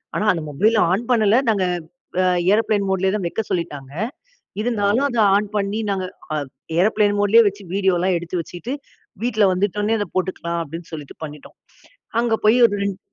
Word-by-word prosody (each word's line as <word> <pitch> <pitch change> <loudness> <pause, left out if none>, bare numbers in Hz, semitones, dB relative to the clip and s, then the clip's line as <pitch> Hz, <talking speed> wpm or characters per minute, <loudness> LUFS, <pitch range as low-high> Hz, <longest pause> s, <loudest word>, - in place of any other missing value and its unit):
ஆனா 215 - 0
அந்த 165 -3 -4
mobile 215 +10 +2
on 205 +6 0
பண்ணல. 220 -1 +4
நாங்க 200 -4 +2 0.6
அ - - +2 0.3
ஏரோப்ளேன் 210 -2 +1
மோட்லேயே 190 0 +1
தான் 190 -4 -3
வைக்க 225 - -2
சொல்லிட்டாங்க. 145 -6 -3 0.7
இருந்தாலும் 230 +3 +1
அத 240 - -2 0.2
ஆன் 205 0 +1
பண்ணி 205 +2 -1
நாங்க 190 -2 -2 0.3
அ - - 0 0.2
ப் - - -61 0.3
ஏரோப்ளேன் 205 +1 +3
மோட்லேயே 225 +3 +6
வச்சு 200 0 -13
வீடியோலாம் 190 -2 +2
எடுத்து 175 +1 -3
வச்சிட்டு, 180 - -6 0.5
வீட்டில் 215 -5 +3
வந்துட்ட 205 +2 -1
உடனே 220 +2 +1
அத 205 - -2
போட்டுக்கலாம் 170 -2 -2
அப்படின்னு 165 +3 -9
சொல்லிட்டு 150 -3 -8
பண்ணிட்டோம். 150 -1 -12 0.6
அங்கே 235 -1 +2
போய் 225 +3 +5
ஒரு 225 - +4
2, 195 -1 -2
200 Hz, 170 wpm, -21 LUFS, 180-215 Hz, 0.7 s, மோட்லேயே